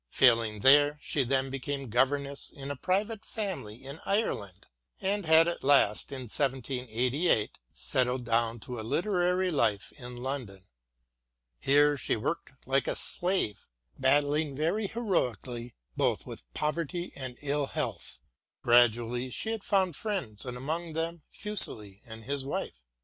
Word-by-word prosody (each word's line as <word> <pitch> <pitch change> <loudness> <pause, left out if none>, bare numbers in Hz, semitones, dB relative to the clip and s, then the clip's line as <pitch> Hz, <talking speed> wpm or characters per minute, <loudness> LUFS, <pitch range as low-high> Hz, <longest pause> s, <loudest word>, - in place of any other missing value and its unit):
Failing 115 - +3
there, 145 +4 +6
she 145 -1 0
then 130 +1 0
became 135 0 -3
governess 140 +4 0
in 140 -1 -7
a - - -3
private 200 - -1
family 135 - -5
in 140 +4 -6
Ireland, 100 - -1 0.3
and 200 -2 -1
had 160 +1 +7
at 170 - -2
last, 135 -7 +4
in 135 -2 -4
1788, 125 0 0
settled 125 -1 0
down 115 0 +1
to 125 +1 -6
a - - -3
literary 180 - +1
life 110 - +1
in 125 -3 -9
London. 120 -7 -5 1.0
Here 145 +1 +4
she - - 0
worked 135 +5 -3
like 135 +1 +2
a - - 0
slave, 180 - -1 0.3
battling 145 +2 +2
very 170 +9 0
heroically 125 - -2 0.2
both - - +1
with - - -10
poverty 170 +3 -2
and 130 -2 -6
ill 145 0 0
health. 140 -9 -4 0.4
Gradually 120 +1 +3
she 220 - -3
had 225 -3 -4
found 190 -5 +1
friends, 140 - -4
and 125 0 -4
among 160 +5 -3
them 165 +1 -3
Fuseli 110 - 0
and 110 0 -9
his 140 +3 -2
wife. 135 - -4
135 Hz, 140 wpm, -29 LUFS, 120-165 Hz, 1.0 s, had